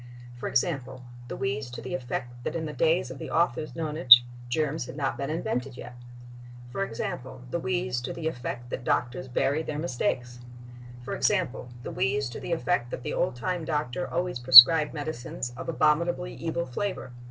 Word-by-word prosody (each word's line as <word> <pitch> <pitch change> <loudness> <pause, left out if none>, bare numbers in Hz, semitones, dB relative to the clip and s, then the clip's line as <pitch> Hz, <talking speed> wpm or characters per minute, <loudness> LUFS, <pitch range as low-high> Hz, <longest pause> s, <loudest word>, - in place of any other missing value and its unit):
For 120 - -5
example, 130 -3 -2 0.2
the - - -6
wheeze 130 0 -3
to 120 - -8
the 130 - -7
effect 120 -1 -5
that - - -4
in 160 -1 -3
the 150 - -5
days 165 -4 +1
of 130 - -9
the - - -7
author's 155 -2 0
nonage 150 -6 +7 0.3
"germs 150 0 -1
had 140 - -9
not 135 -2 -1
been 140 +1 -4
invented 135 -5 -3
yet." 125 - -9 0.8
For 195 - -2
example, 130 -2 -6
the 170 - -1
wheeze 160 -10 -2
to - - -5
the 160 -2 -4
effect 120 -4 -5
that 130 - -4
doctors 125 +2 -1
bury 140 +4 0
their 155 -2 -5
mistakes. 125 -5 -2 0.7
For - - -4
example, 180 -11 0
the - - -6
wheeze 135 +1 -1
to - - -7
the - - -6
effect 165 -6 0
that 125 - -6
the - - -4
old 175 - -1
time 175 +6 -3
doctor 150 0 -3
always 175 -5 -2
prescribed 130 +5 +10
medicines 135 -5 -5
of - - -7
abominably 170 +3 +1
evil 170 +1 -3
flavor.... 130 0 -4
140 Hz, 180 wpm, -27 LUFS, 125-165 Hz, 0.8 s, prescribed